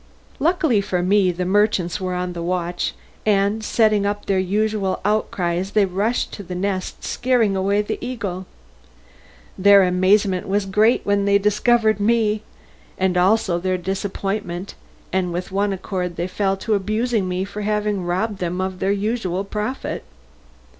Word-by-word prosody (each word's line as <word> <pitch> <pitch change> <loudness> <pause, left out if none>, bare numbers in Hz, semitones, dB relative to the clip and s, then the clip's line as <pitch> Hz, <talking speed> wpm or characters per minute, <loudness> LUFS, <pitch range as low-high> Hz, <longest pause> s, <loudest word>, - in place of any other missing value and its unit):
Luckily 315 - +2
for 185 -3 -1
me 190 0 +3
the 180 +1 -3
merchants 195 -2 +1
were 185 -1 -2
on 180 0 -3
the 170 - -5
watch, 175 0 -2 0.3
and 205 +1 +1
setting 215 -2 +2
up 205 +1 -2
their 195 -1 +1
usual 200 +1 0
outcries 190 -3 -1
they 210 -2 +4
rushed 200 +6 -1
to - - -7
the 185 -2 -7
nest 190 0 -3
scaring 240 -5 +1
away 200 +2 +1
the - - -4
eagle. 195 -7 -4 1.1
Their 200 0 +7
amazement 185 +1 +2
was 200 +1 0
great 210 +5 +3
when 200 0 +1
they 200 0 +4
discovered 215 +1 +2
me, 215 0 +2 0.6
and 190 -1 +1
also 185 -1 +2
their 185 +1 0
disappointment, 195 0 -3 0.4
and 185 -2 0
with 180 +2 -4
one 200 +1 +1
accord 180 -2 -3
they 170 - -2
fell 195 +1 -1
to 220 +3 -1
abusing 215 0 0
me 180 +1 -1
for 200 +1 -7
having 210 -2 -1
robbed 190 +4 -1
them 180 0 -2
of 185 0 -3
their 195 - +1
usual 200 -2 -1
profit. 210 +6 -4
200 Hz, 155 wpm, -21 LUFS, 185-210 Hz, 1.1 s, Their